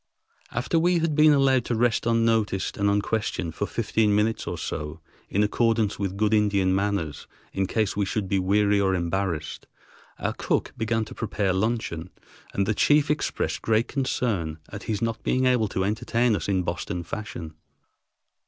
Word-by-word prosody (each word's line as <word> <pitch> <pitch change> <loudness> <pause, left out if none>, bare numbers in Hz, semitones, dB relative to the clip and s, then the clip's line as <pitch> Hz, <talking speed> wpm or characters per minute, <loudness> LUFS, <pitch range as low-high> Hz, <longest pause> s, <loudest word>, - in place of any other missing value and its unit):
After 125 +7 0
we 175 +2 +3
had 165 -2 0
been 155 +1 +6
allowed 135 -3 +4
to 120 - -1
rest 115 0 +1
unnoticed 115 -4 +1
and 100 0 +1
unquestioned 100 -4 -1
for 100 - -2
fifteen 110 -2 +1
minutes 110 +2 0
or - - -3
so, 75 +2 -5 0.3
in 105 - +2
accordance 110 0 +1
with 100 -1 -2
good 105 +1 +2
Indian 100 -3 +3
manners 95 -6 -1 0.3
in 95 -1 0
case 110 0 0
we 105 - +1
should 100 0 -2
be 95 +1 +1
weary 100 +2 +3
or 95 -1 +2
embarrassed, 85 -3 -2 0.5
our - - -2
cook - - -1
began 110 0 0
to - - -10
prepare 105 -4 -1
luncheon; 95 -4 -1 0.4
and 100 - 0
the 110 - +1
chief 145 +6 +3
expressed 150 - -1
great 110 +1 +2
concern 110 - -1
at - - -7
his 105 0 -1
not 115 -1 -2
being 130 0 +1
able 125 -4 +3
to 95 -1 -2
entertain 115 +3 +1
us 90 0 -3
in 95 -2 +1
Boston 85 0 -3
fashion. 85 -3 -6
105 Hz, 170 wpm, -25 LUFS, 95-115 Hz, 0.5 s, been